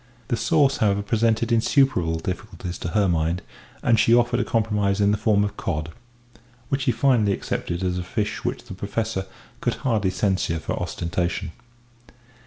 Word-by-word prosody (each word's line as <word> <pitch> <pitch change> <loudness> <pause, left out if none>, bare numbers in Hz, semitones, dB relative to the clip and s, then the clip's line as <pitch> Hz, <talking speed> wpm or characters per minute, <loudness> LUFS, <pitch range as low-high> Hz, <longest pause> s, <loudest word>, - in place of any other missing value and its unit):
The - - +2
sauce, 135 +4 +2
however, 100 -2 +2
presented 115 +2 +1
insuperable 115 - +3
difficulties 90 +1 -5
to - - -4
her 100 +4 +2
mind, 85 +1 0 0.4
and 115 -3 +4
she 115 - +5
offered 120 0 +2
a - - +2
compromise 105 -3 0
in 100 0 +4
the - - +3
form 105 -1 +2
of 100 - -3
cod 75 +2 -3 0.8
which 135 -1 0
he 125 - +4
finally 120 -7 +3
accepted 85 -1 -3
as 90 -1 0
a - - -3
fish 105 +3 -3
which - - -2
the 120 -5 -9
Professor 100 0 -3 0.3
could - - 0
hardly 110 -6 +2
censure 95 -3 0
for 80 - -4
ostentation. 85 0 -2
105 Hz, 165 wpm, -24 LUFS, 90-115 Hz, 0.8 s, she